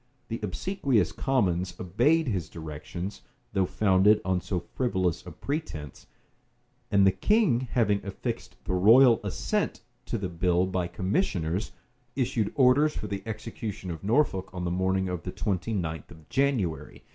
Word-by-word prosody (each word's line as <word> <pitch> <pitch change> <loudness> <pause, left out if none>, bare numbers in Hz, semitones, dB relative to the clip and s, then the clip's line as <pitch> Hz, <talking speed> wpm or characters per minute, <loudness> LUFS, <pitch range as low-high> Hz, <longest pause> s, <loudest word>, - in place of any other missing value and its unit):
The 115 - -3
obsequious 120 - 0
commons 90 -9 0
obeyed 135 - +2
his 90 -9 -2
directions, 80 +4 -7 0.3
though 95 -2 +2
founded 95 +2 +4
on 95 -1 +1
so 90 -1 -2
frivolous 90 -2 -1
a - - -6
pretence; 80 - -5 0.8
and 100 -1 +4
the 95 - +6
king 210 - +3
having 105 -5 +2
affixed 100 -1 -5
the 95 - -1
royal 115 +6 +6
assent - - -2 0.3
to - - -1
the 95 -3 -3
bill 90 +1 +1
by 95 -2 -1
commissioners, 90 - -1 0.4
issued 120 -5 0
orders 145 +3 +4
for - - -4
the 100 -1 -4
execution 110 -4 -5
of 80 -2 -7
Norfolk 100 -4 +1
on 90 -1 -5
the 85 - -1
morning 95 +1 +1
of 90 -2 -3
the 90 - -5
twenty 100 +2 -2
ninth 80 -7 -3
of 80 0 -15
January. 130 - -1
95 Hz, 145 wpm, -27 LUFS, 90-115 Hz, 0.8 s, the